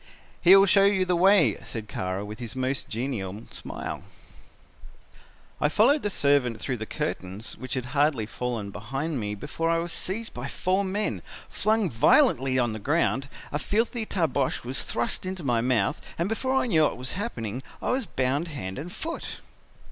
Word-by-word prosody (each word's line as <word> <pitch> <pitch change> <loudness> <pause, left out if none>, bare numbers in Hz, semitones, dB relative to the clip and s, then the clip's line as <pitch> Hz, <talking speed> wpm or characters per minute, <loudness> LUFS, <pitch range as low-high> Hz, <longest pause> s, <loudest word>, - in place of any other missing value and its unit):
"'He 180 +2 +9
will 195 0 +8
show 195 0 +5
you 195 -2 +3
the 180 -1 +2
way,' 195 +3 +5
said 110 -2 -5
Kara 95 +1 -3
with 105 +1 -8
his 115 -1 -6
most 130 +1 -2
genial 110 -4 -3
smile. - - -6 1.6
"I 150 - +4
followed 255 - +4
the 205 - -1
servant 140 - +2
through 125 +2 -2
the 110 0 -5
curtains 105 -9 -4
which 130 0 -5
had 130 -2 -2
hardly 145 -6 +2
fallen 115 -2 -4
behind 135 +9 -3
me 105 -1 -3
before 150 +9 -2
I 165 - +3
was 170 0 -3
seized 220 +5 -4
by 120 +2 -5
four 185 +7 0
men, 200 +2 -1 0.3
flung 215 -1 +2
violently 130 0 +4
on 120 -3 +2
the 110 - -5
ground, 140 +1 +1 0.2
a 145 - -1
filthy 225 +4 0
tarbosch 150 -7 0
was 125 +2 -3
thrust 120 0 -2
into 185 -2 -5
my 120 -4 +2
mouth 120 -5 +1 0.2
and 170 - 0
before 260 +5 0
I 265 - +3
knew 170 -10 +3
what 150 - +2
was 125 +1 -3
happening 125 - -3 0.2
I - - -1
was 255 -4 0
bound 135 +6 0
hand 95 - -5
and 170 +5 -6
foot. 330 - -5
140 Hz, 180 wpm, -27 LUFS, 120-185 Hz, 1.6 s, He